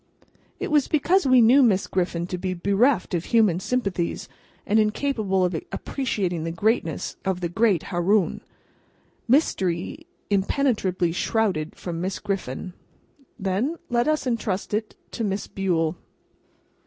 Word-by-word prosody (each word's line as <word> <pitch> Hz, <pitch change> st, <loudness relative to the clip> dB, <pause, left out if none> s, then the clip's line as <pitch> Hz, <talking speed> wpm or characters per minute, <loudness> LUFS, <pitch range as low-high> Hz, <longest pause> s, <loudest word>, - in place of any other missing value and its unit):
It -, -, -3 dB
was 295 Hz, -3 st, +3 dB
because 330 Hz, +3 st, +2 dB
we 255 Hz, -1 st, +6 dB
knew 255 Hz, +5 st, +6 dB
Miss 205 Hz, -7 st, +3 dB
Griffin 175 Hz, -2 st, -1 dB
to 180 Hz, 0 st, -5 dB
be 185 Hz, 0 st, -2 dB
bereft 200 Hz, +5 st, +2 dB
of 170 Hz, -1 st, -1 dB
human 215 Hz, -7 st, +3 dB
sympathies, 195 Hz, -6 st, -2 dB, 0.4 s
and 215 Hz, +2 st, +3 dB
incapable 210 Hz, -4 st, +1 dB
of 180 Hz, -, -1 dB, 0.2 s
appreciating 190 Hz, -, -2 dB
the 165 Hz, -, -3 dB
greatness 170 Hz, -2 st, -1 dB
of 190 Hz, -2 st, -1 dB
the 175 Hz, -2 st, -2 dB
great 200 Hz, -2 st, +2 dB
Haroun. 185 Hz, +1 st, +1 dB, 0.9 s
Mystery 235 Hz, -, 0 dB, 0.2 s
impenetrably 195 Hz, -4 st, +1 dB
shrouded 185 Hz, -4 st, -1 dB
from 170 Hz, -2 st, -5 dB
Miss 190 Hz, +1 st, -2 dB
Griffin 185 Hz, -2 st, -4 dB, 0.6 s
then, 205 Hz, -, -1 dB, 0.2 s
let 240 Hz, +2 st, +2 dB
us 310 Hz, -2 st, +1 dB
entrust 215 Hz, -6 st, -2 dB
it 215 Hz, +1 st, -2 dB, 0.2 s
to 230 Hz, -, -4 dB
Miss 200 Hz, -1 st, -2 dB
Bule. 170 Hz, -4 st, 0 dB
195 Hz, 130 wpm, -24 LUFS, 180-235 Hz, 0.9 s, we